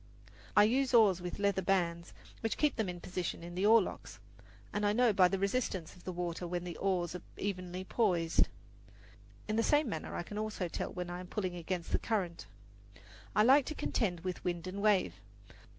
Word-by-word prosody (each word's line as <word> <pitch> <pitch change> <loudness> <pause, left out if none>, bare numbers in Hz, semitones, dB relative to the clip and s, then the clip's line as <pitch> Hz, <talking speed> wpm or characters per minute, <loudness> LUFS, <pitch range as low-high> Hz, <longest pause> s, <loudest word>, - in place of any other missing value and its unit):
I 210 - +9
use 255 +4 +2
oars 200 -6 +5
with 180 -1 -5
leather 200 -1 +1
bands, 175 -3 0 0.3
which 225 - -2
keep 300 -2 +2
them 220 -5 -1
in 175 0 -5
position 180 -2 -4
in 175 0 -8
the 190 +3 +1
oarlocks, 220 -3 +2 0.6
and 205 - -1
I 205 0 +3
know 240 -1 +4
by 185 -2 +6
the 195 - -1
resistance 195 -4 -1
of 180 - -18
the 185 - -3
water 175 0 -3
when 175 0 -3
the 175 -2 -6
oars 180 -3 0
are 180 - -6 0.2
evenly 185 -2 -3
poised. 180 -6 +2 1.0
In 215 - -1
the - - +4
same 295 +4 +3
manner 160 -8 -4
I - - -2
can 210 +4 -6
also 215 -4 -2
tell - - -4
when 180 -1 -5
I 175 - -5
am 180 - -8
pulling 185 -2 -2
against 175 0 -4
the - - +2
current. 185 -7 -2 0.9
I 210 - +5
like 270 +4 +6
to 310 - -4
contend 190 - -1
with 185 0 -4
wind 175 -1 -2
and 190 +2 -5
wave. 210 -3 +3
185 Hz, 200 wpm, -33 LUFS, 175-215 Hz, 1.0 s, I